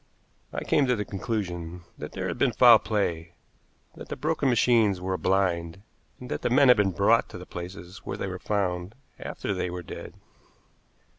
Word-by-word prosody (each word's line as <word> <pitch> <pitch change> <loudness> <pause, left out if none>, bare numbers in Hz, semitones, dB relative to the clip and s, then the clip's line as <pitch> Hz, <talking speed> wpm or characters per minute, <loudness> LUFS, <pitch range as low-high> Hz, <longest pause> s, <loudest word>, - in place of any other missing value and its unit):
I - - -4
came 140 -3 +2
to 125 - +3
the 105 -2 -3
conclusion 90 -5 -4
that 75 - -8
there 95 0 -3
had 85 - -4
been 130 -4 +2
foul 115 0 +8
play, 85 -6 -2 0.6
that - - -11
the - - -3
broken 150 -3 0
machines 115 -5 +3
were 95 +1 -2
a 90 - -2
blind, 90 0 0 0.4
and 125 - -9
that - - -2
the - - 0
men 135 +2 +5
had 125 - +7
been 105 -1 +3
brought 100 +5 +3
to - - -8
the 90 - -9
places 90 +1 -8
where - - -6
they - - -3
were 95 -1 -5
found 95 -1 -2 0.2
after 100 - -4
they 90 -1 -2
were 90 0 -6
dead. - - -9
95 Hz, 195 wpm, -26 LUFS, 90-115 Hz, 0.6 s, foul